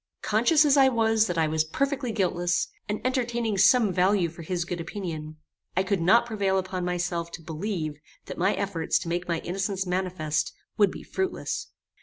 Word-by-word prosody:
Conscious 240 +9 +4
as 285 -1 +4
I 270 -1 +7
was 225 -2 +2
that 175 - -3
I 160 - +3
was 155 0 +1
perfectly 270 - -1
guiltless, 175 -4 0 0.2
and 210 - -1
entertaining 240 -5 0
some 205 0 +5
value 185 0 +3
for 165 +1 -11
his 170 +1 -2
good 175 -1 -4
opinion, 165 -4 -6 0.4
I 190 - +4
could 190 -2 0
not 225 +8 +5
prevail 200 -4 0
upon 185 -1 -2
myself 175 -1 -2
to 165 - -7
believe 160 -2 -4 0.3
that - - -6
my 190 +4 +2
efforts 185 -5 0
to - - -5
make 175 +1 -2
my 170 -2 -1
innocence 195 +1 -2
manifest, 180 -4 -1 0.2
would 205 -3 +4
be - - -9
fruitless. 380 -1 -3
190 Hz, 180 wpm, -26 LUFS, 170-220 Hz, 0.4 s, I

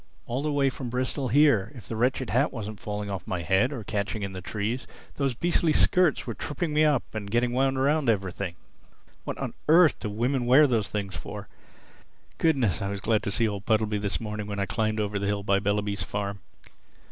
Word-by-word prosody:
All 125 +3 -2
the 150 +1 -1
way 140 -2 +2
from 125 -1 -6
Bristol 130 +2 -1
here, 130 -6 +4
if 120 - -11
the 115 - -4
wretched 125 +2 0
hat 130 +6 +2
wasn't 110 -3 -6
falling 105 -1 -4
off 95 -2 -5
my 90 -2 -2
head 95 - +2
or 125 -6 -5
catching 105 +1 -3
in 100 -1 -4
the 95 - -6
trees, 110 +6 -3 0.3
those 135 -3 -1
beastly 170 +2 +1
skirts 180 -1 +3
were 115 - -3
tripping 150 +6 -3
me 155 +1 +4
up 150 -4 +3
and 105 -2 -5
getting 120 +2 +1
wound 135 +1 +1
round 140 0 +2
everything. 95 -3 -1 0.7
What - - -4
on - - -4 0.2
earth 165 -1 +6
do 105 - -4
women 120 +4 -1
wear 135 +5 +7
those 115 -6 +1
things 100 -2 -3
for? - - -7 0.9
Goodness, 135 - +2
I 100 - -2
was 100 0 -3
glad 110 +1 +1
to 105 - -3
see 115 +3 +4
old 100 -2 -5
Puddleby 110 -2 +1
this 100 -5 -1
morning 105 -2 -5
when 100 -1 -4
I 100 - +1
climbed 110 +2 -1
over 105 -1 -1
the 100 - -2
hill 100 0 -1
by 100 0 +2
Bellaby's 100 -1 -1
farm!" 100 +2 -3
110 Hz, 210 wpm, -27 LUFS, 100-130 Hz, 0.9 s, wear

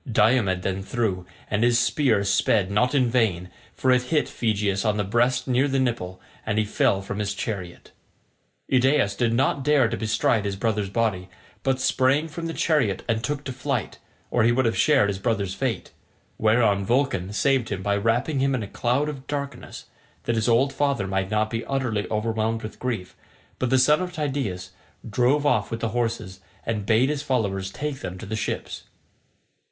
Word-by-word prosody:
Diomed 105 -4 +3
then 95 0 -2
threw, 95 -5 -2 0.2
and 105 +2 0
his 120 -1 +4
spear 120 -3 +2
sped 100 0 +2
not 125 +7 +2
in 130 -3 +3
vain, 105 -8 0 0.2
for 130 - +2
it 125 0 +4
hit 145 +4 0
Phegeus 105 -3 -1
on 105 -2 +1
the 105 - +1
breast 120 +5 +1
near 130 +2 +2
the 135 -1 0
nipple, 115 -8 -1 0.2
and 110 -1 -2
he 110 - +2
fell 100 -1 +1
from 100 +1 -5
his 105 -1 -2
chariot. 90 -6 -6 0.8
Idaeus 130 -5 +3
did 115 +2 +1
not 130 +3 +1
dare 145 -3 +4
to 115 - -2
bestride 110 -1 +1
his 100 -1 -2
brother's 105 -1 -1
body, 100 -4 -1 0.3
but 135 -1 0
sprang 130 +4 +2
from 165 +1 -6
the 165 - -4
chariot 130 - +1
and 115 -1 0
took 145 +1 -2
to 130 - -5
flight, 130 -3 -3 0.3
or 120 - +2
he 115 - +4
would 130 +2 +2
have 115 - +1
shared 145 -9 +4
his 100 -1 -3
brother's 100 -3 -1
fate; 125 +1 -3 0.5
whereon 110 -2 +3
Vulcan 115 -5 0
saved 130 +2 +1
him 95 -2 -4
by 100 +1 +1
wrapping 115 +7 0
him 135 0 +2
in 120 - -2
a - - -5
cloud 125 +8 0
of 135 -3 -7
darkness, 140 -1 -5 0.4
that 120 - 0
his 110 +1 +1
old 130 +4 +3
father 140 -8 0
might 95 0 -1
not 110 +1 0
be 115 0 -2
utterly 120 -7 -1
overwhelmed 110 +1 -1
with 110 - -8
grief; 115 -8 -4 0.4
but 130 - 0
the 130 - +4
son 150 +5 +4
of 180 -1 -3
Tydeus 130 - -3 0.4
drove 125 +7 +2
off 125 -7 +2
with 115 - -4
the 115 - -1
horses, 115 -5 -2 0.3
and 105 -3 -2
bade 120 +4 +4
his 150 -1 -1
followers 100 -9 -1
take 145 +1 -4
them 95 -8 -6
to - - -8
the 110 - -4
ships. 110 - -4
115 Hz, 190 wpm, -24 LUFS, 100-130 Hz, 0.8 s, his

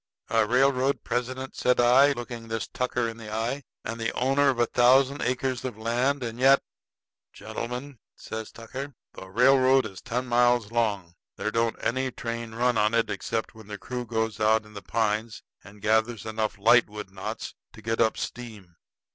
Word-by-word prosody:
"A 110 -1 +3
railroad 135 +2 +2
president," 130 +2 -3
said 125 0 +2
I, 130 +4 +6
looking 120 -2 -7
this 115 0 -3
Tucker 125 -2 -1
in 115 0 -6
the 110 -2 -9
eye, 115 +6 -2 0.2
"and 115 +1 -4
the 115 - 0
owner 135 +2 +2
of 130 - 0
a 120 - +3
thousand 130 +4 +4
acres 130 0 -1
of 125 -5 -5
land; 125 +5 0
and 115 0 -5
yet 135 +2 +5 0.4
" - - -66
"Gentlemen," 125 +2 -6 0.2
says 110 -1 -7
Tucker, 130 +5 -8 0.2
"The 95 - -10
railroad 130 +4 +4
is 95 -3 -8
ten 125 +2 -3
miles 120 -2 +2
long. 105 -7 -1 0.2
There 110 - -3
don't 115 0 +1
any 130 +2 -1
train 115 -2 -5
run 120 -1 +2
on 105 +2 +2
it 115 - +1
except 115 0 -3
when 110 -2 -14
the 105 0 -6
crew 125 +4 -5
goes 110 -1 -2
out 110 0 +3
in 105 - -16
the 100 - -8
pines 110 +2 -1 0.2
and 100 0 -15
gathers 110 +1 +1
enough 110 -1 -2
lightwood 105 -2 +3
knots 95 -1 -6 0.2
to 110 - -14
get 115 +1 0
up 110 - +2
steam. 105 -8 -7
115 Hz, 180 wpm, -26 LUFS, 110-125 Hz, 0.4 s, I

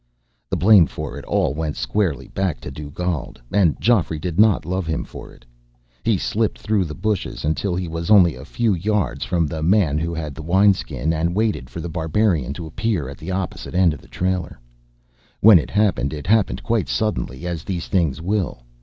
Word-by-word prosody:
The - - 0
blame 95 -4 +6
for - - -6
it - - -11
all - - +1
went 75 0 -3
squarely 70 - -1
back 95 -8 -2
to - - -7
Dugald, 75 0 -4
and 95 -7 +3
Geoffrey 100 -9 +2
did 85 +3 -4
not 105 -7 +4
love 90 0 -2
him 80 0 -1
for - - -10
it. - - -19 0.6
He 115 -3 +2
slipped 110 +4 -1
through 105 -3 0
the 75 -2 -6
bushes 105 -3 -2
until 85 +4 0
he 90 0 -2
was 85 0 -4
only 95 -6 +6
a 65 - -10
few 110 +8 0
yards 105 +3 -1
from 85 -3 +1
the 80 +1 -4
man 80 -4 +3
who 85 +1 -2
had 80 -3 -4
the 75 - -8
wineskin, 90 -2 +2
and 85 +2 -1
waited 105 - 0
for 85 - -7
The 85 - -4
Barbarian 80 - 0
to 85 - -6
appear 80 - -2
at 70 -2 -10
the 80 - -7
opposite 95 -1 -4
end 90 -3 +4
of 70 - -10
the - - -18
trailer. 90 -6 -2 0.8
When 105 -4 +8
it - - -5
happened, 95 - +1
it 75 -1 -6
happened 105 +1 +2
quite 115 -4 0
suddenly, 80 - -2
as 85 -3 -3
these 90 -4 -4
things 80 -7 +1
will. 95 -9 -1
85 Hz, 200 wpm, -21 LUFS, 80-100 Hz, 0.8 s, When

